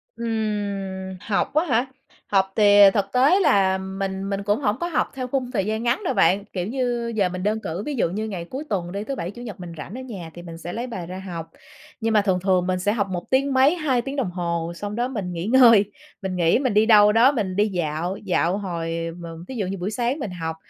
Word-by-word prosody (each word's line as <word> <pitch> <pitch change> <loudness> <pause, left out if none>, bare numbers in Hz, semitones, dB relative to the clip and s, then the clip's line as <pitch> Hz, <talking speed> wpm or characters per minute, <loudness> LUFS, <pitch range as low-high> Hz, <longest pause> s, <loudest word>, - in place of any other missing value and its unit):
Ừm, 200 -4 -3
học 205 - -1
á 310 +4 +2
hả? 245 -4 +2 0.4
Học 190 -1 +2
thì, 205 -1 +5
à, 200 - +10
thực 200 -2 +1
tế 275 +10 +5
là 190 - +3
mình 190 +1 -4
mình 200 0 -2
cũng 205 +2 +1
hổng 210 -7 +1
có 345 - -1
học 305 -8 0
theo 255 -2 -4
khung 255 -1 -2
thời 200 -7 0
gian 220 +2 -2
ngắn 240 - 0
đâu - - 0
bạn, 190 +4 +3
kiểu 180 0 -2
như, 240 -2 -1
giờ 195 -4 +2
mình 185 +1 -5
đơn 215 +2 0
cử 170 +5 -4
ví 295 - -3
dụ 225 - +1
như 215 +5 -3
ngày 185 -5 -5
cuối 270 +3 -5
tuần 175 -4 -2
đi, 200 +1 -4
thứ 275 +5 -4
Bảy 180 -6 -4
Chủ 240 - -11
nhật 215 -7 -8
mình 175 -2 -8
rảnh 165 +6 -8
ở 260 - -6
nhà 195 -10 -7
thì 175 - -9
mình 165 -1 -9
sẽ 170 +1 -7
lấy 240 +2 -4
bài 185 -8 -6
ra 185 +2 -7
học, 165 -1 -6 0.5
nhưng 225 0 0
mà 210 - +5
thường 190 -3 +1
thường 185 -1 +1
mình 185 0 0
sẽ 205 +3 +1
học 205 -3 0
một 175 -2 -5
tiếng 270 +1 +2
mấy, 265 +5 +5
2 280 -8 +1
tiếng 270 +3 -5
đồng 250 -11 -1
hồ 170 -1 -2
xong 205 +3 -5
đó 240 +2 0
mình 210 -9 -4
nghỉ 170 +1 -4
ngơi, 230 -3 +6 0.4
mình 190 -2 -3
nghỉ 170 +4 +3
mình 255 -6 0
đi 215 +1 +4
đâu 210 -2 +7
đó 235 +5 +5
mình 195 -8 -2
đi 210 +1 +3
dạo, 175 0 -2
dạo 180 0 +1
hồi 165 -3 -3
mờ 165 -1 -8
thí 260 - -7
dụ 205 - -1
như 195 - -3
buổi 190 +4 -3
sáng 245 +6 -1
mình 215 -9 -4
học, 160 -2 -4
200 Hz, 260 wpm, -23 LUFS, 180-235 Hz, 0.5 s, à